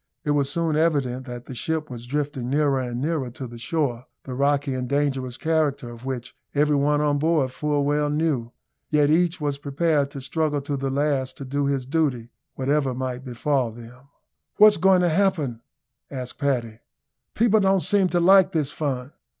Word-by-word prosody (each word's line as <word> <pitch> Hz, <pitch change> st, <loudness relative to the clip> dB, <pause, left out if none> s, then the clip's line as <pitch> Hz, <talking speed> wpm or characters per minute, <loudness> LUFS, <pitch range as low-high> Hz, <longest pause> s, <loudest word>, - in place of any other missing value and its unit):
It 150 Hz, -, 0 dB
was 140 Hz, -2 st, +1 dB
soon 165 Hz, 0 st, 0 dB
evident 140 Hz, -5 st, 0 dB
that 120 Hz, -1 st, -7 dB
the -, -, -8 dB
ship 155 Hz, +5 st, -2 dB
was 120 Hz, -1 st, -8 dB
drifting 140 Hz, -2 st, -2 dB
nearer 140 Hz, -1 st, +2 dB
and 120 Hz, -2 st, -3 dB
nearer 145 Hz, -2 st, -1 dB
to 130 Hz, +2 st, -8 dB
the 120 Hz, -1 st, -10 dB
shore, 125 Hz, -3 st, -2 dB, 0.2 s
the 130 Hz, -, -7 dB
rocky 140 Hz, +1 st, +1 dB
and 125 Hz, -1 st, -3 dB
dangerous 135 Hz, -3 st, -1 dB
character 150 Hz, -6 st, 0 dB
of 120 Hz, +2 st, -11 dB
which 125 Hz, -2 st, -5 dB, 0.2 s
every 150 Hz, +1 st, +3 dB
one 145 Hz, +1 st, +2 dB
on 145 Hz, -1 st, +1 dB
board 155 Hz, -4 st, +1 dB
full 145 Hz, +1 st, -1 dB
well 145 Hz, +1 st, +1 dB
knew, 145 Hz, -6 st, -1 dB, 0.4 s
yet 150 Hz, -1 st, +3 dB
each 175 Hz, +2 st, +2 dB
was 145 Hz, -2 st, -2 dB
prepared 145 Hz, 0 st, 0 dB
to 140 Hz, -, -8 dB
struggle 145 Hz, +2 st, -1 dB
to 145 Hz, +1 st, -3 dB
the 135 Hz, 0 st, -2 dB
last 140 Hz, -1 st, -1 dB
to 140 Hz, -, -7 dB
do 140 Hz, +2 st, -1 dB
his 135 Hz, -2 st, -1 dB
duty, 130 Hz, -5 st, -1 dB, 0.2 s
whatever 135 Hz, -1 st, 0 dB
might 130 Hz, 0 st, -4 dB
befall 130 Hz, 0 st, -1 dB
them. 120 Hz, +4 st, -13 dB, 0.5 s
"What's 210 Hz, 0 st, +7 dB
going 190 Hz, -1 st, +4 dB
to 175 Hz, -, +3 dB
happen?" 155 Hz, -, 0 dB, 0.5 s
asked 130 Hz, -2 st, -6 dB
Paddy. 120 Hz, -6 st, -1 dB, 0.6 s
"People 220 Hz, -1 st, +4 dB
don't 195 Hz, -1 st, +3 dB
seem 200 Hz, -1 st, +3 dB
to 175 Hz, -, +1 dB
like 190 Hz, +2 st, +5 dB
this 150 Hz, -4 st, 0 dB
fun." 135 Hz, -3 st, -3 dB
140 Hz, 180 wpm, -24 LUFS, 130-155 Hz, 0.6 s, What's